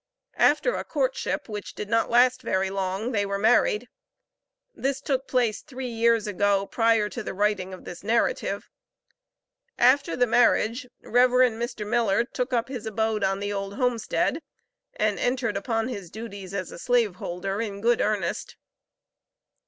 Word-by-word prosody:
After - - +4
a - - -3
courtship, - - -2
which 210 -2 -7
did 210 - -5
not 230 +1 +1
last 250 +2 +4
very 190 -5 0
long, 195 +4 -2
they 205 -4 +1
were 200 0 -2
married. 220 +1 +3 0.9
This 270 0 -2
took 270 -1 -2
place 240 -4 +1
three 260 -3 -6
years 230 -1 +2
ago, 205 -1 +1
prior 225 -1 +2
to 240 - -5
the 200 - -6
writing 200 -2 0
of 185 - -10
this 175 - -9
narrative. 235 - 0 1.1
After 275 +6 +4
the 250 - +3
marriage, 240 +1 +2
Rev. 250 +2 +4
Mr. 240 -3 +1
Miller 225 -1 +2
took 250 +1 -4
up 240 -2 +1
his 250 -5 -6
abode 220 0 -1
on 195 0 +1
the 205 0 -2
old 200 0 -4
homestead, 250 +4 0 0.5
and - - 0
entered 245 -4 0
upon 225 +3 -1
his 200 -8 -6
duties 200 -2 -8
as 185 -3 -4
a - - -9
slave 235 -6 +1
holder 195 +4 -3
in 205 -3 -4
good 235 +2 +2
earnest. 210 -2 -1
225 Hz, 155 wpm, -26 LUFS, 200-245 Hz, 1.1 s, After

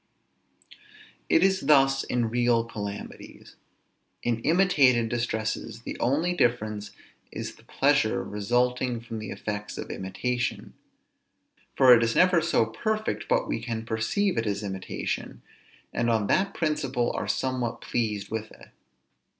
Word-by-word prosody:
It 165 - +5
is 190 0 +3
thus 135 -2 +5
in 120 -2 -1
real 120 -1 +2
calamities. 105 -3 -8 0.7
In 115 -1 0
imitated 140 -8 +3
distresses 115 -1 -3
the - - -5
only 155 +8 +1
difference 110 -8 0 0.4
is - - -5
the - - -21
pleasure - - +2
resulting 120 +4 0
from 115 -1 -7
the 110 -2 -6
effects 105 -1 -5
of - - -6
imitation; 120 +6 -3 1.0
for 130 -2 +8
it 120 - +6
is 115 0 +1
never 180 -2 +5
so 115 - +2
perfect, 215 - -2
but - - +1
we - - -2
can 115 -2 -4
perceive 115 - 0
it 115 - -2
is 100 0 -2
imitation, 95 -2 -4 0.5
and 120 - 0
on 110 -3 +2
that 190 - +1
principle 135 -6 0
are - - -3
somewhat 130 -3 -2
pleased 105 -4 -2
with 110 -1 -3
it. - - -16
120 Hz, 135 wpm, -27 LUFS, 110-135 Hz, 1.0 s, for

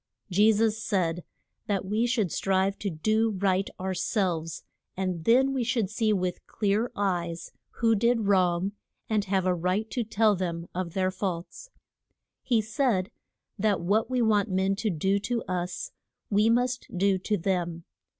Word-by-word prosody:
Je 210 +4 +5
sus 220 0 +1
said 175 -4 0 0.4
that 200 -2 -1
we 215 +5 +1
should 220 -8 0
strive 195 0 +1
to 200 - -2
do 215 +7 +1
right 190 0 +1
our 190 +1 -2
selves, 175 -4 -1 0.3
and 185 -4 -2
then 265 +4 +4
we 260 -2 0
should 225 -4 0
see 220 0 +1
with 185 -3 -1
clear 215 +3 0
eyes 175 -4 -2 0.2
who 230 -1 +1
did 235 +2 +2
wrong, 185 -2 +2 0.4
and 210 -2 +1
have 190 -1 0
a 185 - +3
right 185 +5 -1
to 245 - -1
tell 215 -1 +2
them 170 -2 -3
of 175 -2 -3
their 185 -1 +1
faults. 185 - -5 0.7
He 230 -4 +1
said, 225 -4 0 0.5
that 210 -1 +2
what 210 +6 +1
we 250 -2 +1
want 210 -1 +2
men 190 +1 +1
to 215 - 0
do 190 +3 +1
to 235 +3 -2
us 185 - -3 0.4
we 210 +2 +4
must 245 +1 +1
do 195 0 +2
to 210 +3 -1
them. 175 -2 -2
200 Hz, 160 wpm, -27 LUFS, 185-220 Hz, 0.7 s, Je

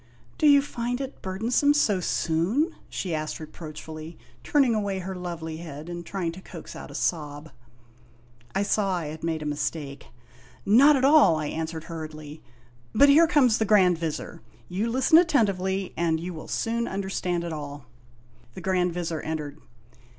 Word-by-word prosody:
" - - -30
Do 305 - +4
you 285 -1 +7
find 245 -2 -3
it 270 0 -6
burdensome 230 +10 +1
so 210 -10 +2
soon? 180 - 0
" - - -28
she 180 -4 -3
asked 155 0 -3
reproachfully, 155 0 -9 0.3
turning 275 -5 +3
away 205 -3 -1
her 190 +1 -5
lovely 170 -3 -5
head 155 -1 -8
and 175 0 -5
trying 175 -1 -3
to 180 +3 -11
coax - - -10
out - - -9
a - - -10
sob. 150 -2 -2 1.0
I 195 - +2
saw 200 -2 +1
I 170 -3 -3
had 155 +1 -9
made 160 -2 -2
a - - -7
mistake. 145 -1 -4 0.3
" 120 0 -25
Not 275 +9 +7
at 265 -1 +2
all," 285 - +6
I 155 -1 -2
answered 160 0 -4
hur 165 -2 -6
riedly; 155 0 -10 0.6
"but 280 +6 +7
here 320 +4 +7
comes 265 -9 +4
the 220 - +2
Grand 185 -5 +4
Vizir; 160 -3 -4 0.3
you 200 - -2
listen 265 +7 +5
attentively, 195 - +1
and 165 -1 +1
you 175 +2 -5
will 155 - -9
soon 235 +1 -1
understand 190 -3 -2
it 170 -1 -4
all." 145 -3 -7 0.7
The - - -7
Grand 180 -1 +1
Vizir 165 -3 -3
en 160 0 -2
tered. 145 -2 -7
180 Hz, 180 wpm, -26 LUFS, 160-225 Hz, 1.0 s, you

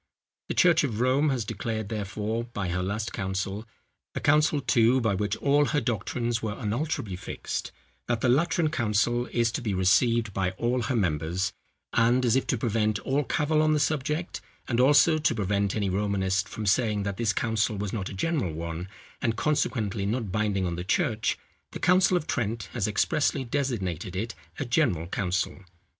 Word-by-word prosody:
The - - -2
church 170 -3 +5
of 115 -6 -2
Rome 130 +5 +3
has 125 -5 -1
declared, 110 -1 -4
therefore, 110 +2 -3
by 105 -6 -4
her 90 +1 -1
last 105 +4 -3
council,—a 95 +3 -5
council, 150 0 +3
too, 120 -1 +3
by 110 -4 +1
which 105 +2 -1
all 145 +1 +3
her 150 +1 +1
doctrines 120 0 -2
were 110 -1 -3
unalterably 120 - -2
fixed,—that 90 - -5
the 125 - +1
Lateran 155 +4 +2
council 120 0 +1
is 115 -1 +1
to 120 - -3
be 105 -5 -2
received 105 +4 +3
by 95 -1 -1
all 120 +2 0
her 125 +2 -1
members; 90 -2 0 0.4
and, 120 +2 +3
as 120 - +3
if 130 - +1
to 125 - +1
prevent 110 -2 0
all 140 +2 0
cavil 150 +3 +1
on 155 0 +3
the 150 - +2
subject, 150 +3 -1 0.3
and 120 -1 0
also 145 +4 +5
to 150 -5 +1
prevent 100 -1 0
any 105 -2 0
Romanist 95 0 0
from 110 - -5
saying 105 0 +2
that 100 -1 -3
this 115 -2 +1
council 110 -2 0
was 100 -1 -3
not 100 -5 -3
a - - -7
general 135 - -1
one, 85 +3 -5 0.3
and 115 -4 0
consequently 115 -9 0
not 110 -2 -2
binding 105 -2 0
on 85 -1 -2
the 90 - -3
church, 110 +4 0 0.4
the - - -5
council 180 0 +4
of 155 - -3
Trent 115 -4 -2
has 110 -5 0
expressly 135 +6 +1
designated 110 - -2
it 110 +4 -3 0.2
a 145 - -2
general 120 - +1
council. 90 +1 -2
115 Hz, 175 wpm, -27 LUFS, 100-130 Hz, 0.4 s, church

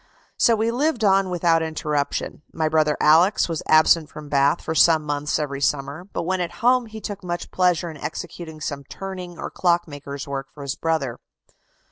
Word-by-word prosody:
So 230 - +4
we 225 +1 0
lived 260 -1 0
on 195 -1 +3
without 170 -2 +2
interruption. 150 -3 -2
My 160 -1 -1
brother 155 -1 +2
Alex. 170 +7 +4
was 165 -3 -3
absent 155 0 +5
from 150 -1 -10
Bath 140 0 +3
for 160 - -4
some 160 0 +5
months 145 0 -1
every 140 -3 -3
summer, 140 +4 -1
but - - -3
when 185 +2 -1
at 175 - -3
home 250 -1 +4
he 220 0 -9
took 205 -2 -6
much 175 -1 -4
pleasure 180 -2 +1
in 155 - -11
executing 160 0 -7
some 140 -1 -4
turning 185 0 -7
or - - -6
clockmaker's 145 -6 -1
work 135 -1 -4
for 145 - -8
his 140 -1 -2
brother." 150 -6 -2
160 Hz, 180 wpm, -23 LUFS, 145-180 Hz, -, absent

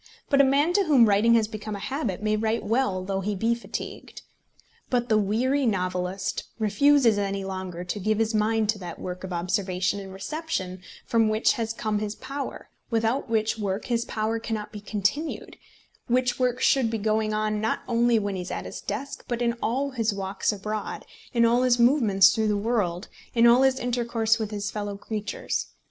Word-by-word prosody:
But 280 0 +6
a - - +6
man 285 +5 +3
to 400 - +4
whom 270 -8 +6
writing 210 +3 +4
has 220 -2 +3
become 215 -1 -6
a - - -6
habit 230 - -3
may 215 0 +2
write 220 +1 0
well 205 -5 0
though 195 0 -2
he 205 +2 -2
be 225 +5 +1
fatigued. 235 - -7 0.7
But 245 -1 0
the 215 - +4
weary 250 +7 +1
novelist 185 -1 -2
refuses 230 +1 +4
any 195 -1 -2
longer 185 -2 -5
to 180 +3 -4
give 215 +2 +1
his 225 0 +1
mind 215 0 +2
to 215 -1 +1
that 175 -3 -7
work 180 0 -6
of 190 - -6
observation 185 +2 -1
and 195 -1 -8
reception 195 - -4 0.2
from 225 -2 +2
which 215 +1 +3
has 225 -1 -2
come 215 -2 -2
his 210 0 -3
power, 275 +4 -6 0.2
without 230 +3 0
which 220 -1 0
work 200 0 -2
his 235 -2 0
power 225 -1 -2
cannot 215 -2 -4
be 210 - -8
continued, 210 - -2 0.5
which 250 +1 +1
work 250 0 +1
should 260 -4 +3
be 225 - -1
going 215 0 0
on 215 0 -1
not 220 - 0
only 235 -1 +3
when 205 -2 -1
he 185 - -3
is 180 - -7
at - - -4
his - - -7
desk, 280 0 -5
but 240 -1 -2
in 235 -1 +1
all 270 +5 0
his 230 -4 0
walks 195 0 -1
abroad, 210 +1 -5 0.3
in 235 -2 +3
all 240 +2 +3
his 250 -1 +3
movements 235 -6 +5
through 220 -1 0
the 210 -1 +1
world, 200 -4 -1 0.3
in 230 0 +5
all 240 +2 +7
his 265 -1 +3
intercourse 235 -2 0
with 215 -2 -2
his 205 -2 -3
fellow 205 -1 -4
creatures. 215 - -3
220 Hz, 195 wpm, -26 LUFS, 200-240 Hz, 0.7 s, all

